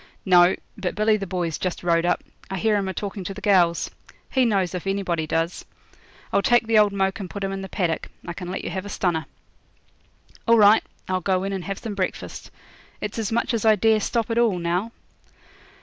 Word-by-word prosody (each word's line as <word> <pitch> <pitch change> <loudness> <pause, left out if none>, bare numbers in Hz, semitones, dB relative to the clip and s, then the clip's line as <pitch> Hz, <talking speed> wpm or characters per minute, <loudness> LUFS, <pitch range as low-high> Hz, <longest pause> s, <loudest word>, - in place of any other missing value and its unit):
'No; 180 -1 +6 0.2
but 180 - -3
Billy 215 +1 +3
the 200 -2 -4
Boy's 175 -3 -2
just 185 -1 -3
rode 170 0 +2
up. - - +1 0.3
I 195 - -3
hear 220 +2 +2
him 200 -2 0
a - - -1
talkin' 200 0 -4
to 195 - -5
the - - -7
gals. 180 -5 +3 0.4
He 260 -2 +3
knows 195 -6 +1
if 180 +1 -5
anybody 180 -5 -1
does. 165 +2 -1 0.7
I'll - - +4
take 240 +3 +3
the 225 -1 +4
old 210 -1 +4
moke 195 +2 0
and 190 -3 -6
put 200 +4 -6
him 195 - -1
in 195 0 -4
the 190 - -7
paddock. 170 -4 -1 0.2
I 170 - -4
can 180 0 -7
let 185 - -4
you - - -4
have 190 -1 -3
a 205 - -8
stunner.' 175 -5 -1 1.2
'All 230 0 +6
right; 210 +1 +6 0.2
I'll 185 -1 -1
go 185 +1 +1
in 195 0 -2
and 190 -2 -4
have 195 -1 -3
some 220 - -5
breakfast. 190 -2 -4 0.5
It's 210 +2 -4
as 220 0 -2
much 235 +2 0
as 230 - 0
I 220 -1 +6
dare 220 +1 +3
stop 230 +2 -1
at 230 - +2
all 225 -6 +3
now.' 175 +6 -1
195 Hz, 220 wpm, -24 LUFS, 180-215 Hz, 1.2 s, No